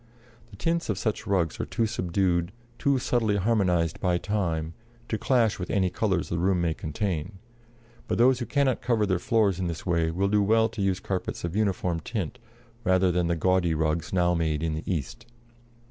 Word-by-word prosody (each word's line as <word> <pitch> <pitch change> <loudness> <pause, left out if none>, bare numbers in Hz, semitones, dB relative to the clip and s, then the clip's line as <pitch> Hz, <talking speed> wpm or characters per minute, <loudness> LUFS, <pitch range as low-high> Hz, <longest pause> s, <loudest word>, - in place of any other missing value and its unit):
The 105 - -13
tints 165 +9 -1
of 100 - 0
such 105 +2 -2
rugs 90 -5 0
are - - -1
too 115 - 0
subdued, 90 -3 0 0.3
too 140 -1 +2
subtly 120 -4 +1
harmonized 90 -6 +1
by 90 -2 +1
time, 85 -6 -2 0.4
to 110 - 0
clash 120 -6 +2
with 90 - -4
any 95 -3 +1
colors 95 -6 0
the 85 - -1
room 90 +1 +2
may 85 -2 +1
contain; 80 +3 -3 0.7
but - - -1
those 125 +1 +4
who 120 - -4
cannot 140 -3 +1
cover 115 -3 +1
their 95 -3 0
floors 100 -3 +2
in 90 - -1
this 85 -2 -5
way 85 -3 +1
will 95 +4 0
do 105 +1 +3
well 110 +2 +3
to 110 - -6
use 95 -1 +1
carpets 95 -1 -4
of 85 +1 -3
uniform 95 -5 0
tint, 90 0 -4 0.4
rather 95 -2 +3
than 90 -1 +1
the 85 - +1
gaudy 85 -1 +2
rugs 80 +1 -1
now 90 -1 +2
made 80 -2 0
in 80 -1 0
the 80 +4 -4
East. 85 - -4
95 Hz, 190 wpm, -26 LUFS, 85-105 Hz, 0.7 s, those